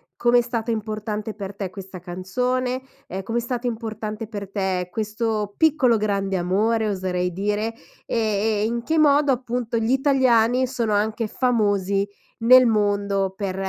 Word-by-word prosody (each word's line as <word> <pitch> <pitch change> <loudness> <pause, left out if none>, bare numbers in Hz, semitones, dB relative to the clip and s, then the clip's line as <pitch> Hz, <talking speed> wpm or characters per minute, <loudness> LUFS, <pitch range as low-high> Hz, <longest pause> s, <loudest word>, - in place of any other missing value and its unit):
com'è 240 0 +4
stato 235 -1 -3
importante 215 -1 -3
per 200 -1 -7
te 195 -3 -4
questa 190 -1 -9
canzone, 250 +9 -2 0.3
ehm, 190 +2 -4
come 230 +3 -1
è - - -2
stato 245 +1 -3
importante 220 -2 -4
per 200 -3 -6
te 190 -3 -1
questo 215 -1 -2
piccolo 290 -7 +4
grande 195 -2 0
amore, 215 +5 +1
oserei 180 -2 -1
dire, 210 +4 -1 0.3
e - - -2 0.4
e - - +2
in 235 +1 -2
che 320 +4 0
modo, 290 -2 +4
appunto, 245 -1 -2
gli 225 +2 0
italiani 260 -3 +3
sono 235 -5 -1
anche 215 +2 0
famosi 205 -5 +1 0.3
nel 255 +2 +7
mondo 200 -3 +1
per 195 -2 -3
220 Hz, 150 wpm, -23 LUFS, 200-240 Hz, 0.4 s, nel